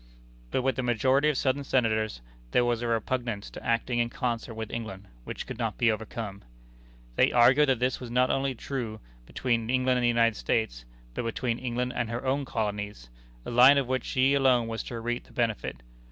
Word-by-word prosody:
But 130 - 0
with 130 -2 0
the - - +1
majority 130 +5 +2
of 150 - 0
Southern 135 +2 0
Senators, 110 - 0 0.3
there 120 - +3
was 120 -1 0
a 120 - -2
repugnance 115 -2 -2
to - - -9
acting 120 +1 0
in 120 0 +1
concert 120 -2 -3
with 110 -1 -5
England, 110 -4 -6 0.2
which - - -5
could - - -7
not 115 -3 -2
be 120 -2 +4
overcome. 110 -2 -5 0.8
They - - +4
argued 130 +4 +5
that 130 - +3
this 125 +2 0
was 125 - -7
not 125 +2 +2 0.3
truly 130 -2 -3
a - - -7
line 110 - -11 0.3
between 115 -3 -1
England 130 0 +2
and - - -1
the - - +4
United 115 -1 +3
States, - - -1 0.3
but - - -3
between 115 +1 -2
England 125 0 -2
and 120 -2 -1
her 120 +3 -4
own 135 +2 0
colonies 105 - -4 0.3
a - - -5
line 125 +4 +7
of 140 - +2
which 130 0 -1
she 130 +1 +2
alone 130 -4 +3
was 115 0 -3
to 120 - -5
reap 120 +1 -3
the - - -19
benefit. 110 - -2
120 Hz, 205 wpm, -28 LUFS, 115-130 Hz, 0.8 s, line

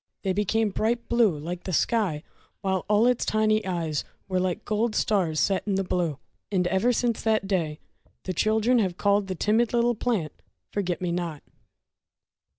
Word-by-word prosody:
They 190 -2 +1
became 210 +2 +1
bright 235 +4 -1
blue 230 -9 +3
like 175 +4 -6
the 185 - -3
sky, 185 -6 +1 0.4
while 190 -2 -1
all 210 +2 +4
its 250 -1 +2
tiny 215 0 +2
eyes 165 -5 -1 0.2
were 185 -1 0
like 185 +3 -2
gold 215 +1 0
stars 175 -7 +1
set 195 -1 +2
in 200 - +1
the 195 - +1
blue! 175 -5 -1 0.3
And 185 -3 +1
ever 190 +7 +2
since 240 -1 0
that 220 -2 +1
day 165 -6 -1 0.5
the 185 - -3
children 220 +6 +2
have 185 -5 0
called 200 -1 +2
the 185 - -3
timid 220 +6 +1
little 240 0 +3
plant, 215 -9 -1 0.4
"Forget 185 -3 -2
Me 175 - 0
Not"! 170 -4 -3
200 Hz, 170 wpm, -26 LUFS, 180-220 Hz, 0.5 s, all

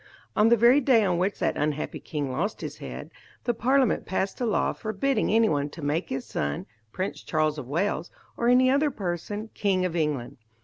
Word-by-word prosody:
On 215 +2 +5
the 235 - +5
very 240 +5 +6
day 245 -5 +4
on 180 -2 +1
which 190 +3 0
that - - 0
unhappy 150 0 -2
king 145 -4 -4
lost 190 +11 -2
his - - -6
head, - - -7 0.3
the 240 - +1
Parliament 260 +2 +2
passed 190 +4 -2
a 240 - +1
law 215 - +1
forbidding 220 +6 -1
anyone 155 -11 +2
to 155 +1 -10
make 150 +5 -1
his 135 -1 -3
son, 70 0 -3 0.3
Prince 185 - -4
Charles 155 -1 0
of 130 - -7
Wales, 170 +2 -1 0.3
or 235 - 0
any 255 +1 +5
other 290 +2 +3
person, 205 - -4
king 190 -3 +1
of 175 -2 -2
England. 145 -5 -1
190 Hz, 190 wpm, -26 LUFS, 150-230 Hz, 0.3 s, very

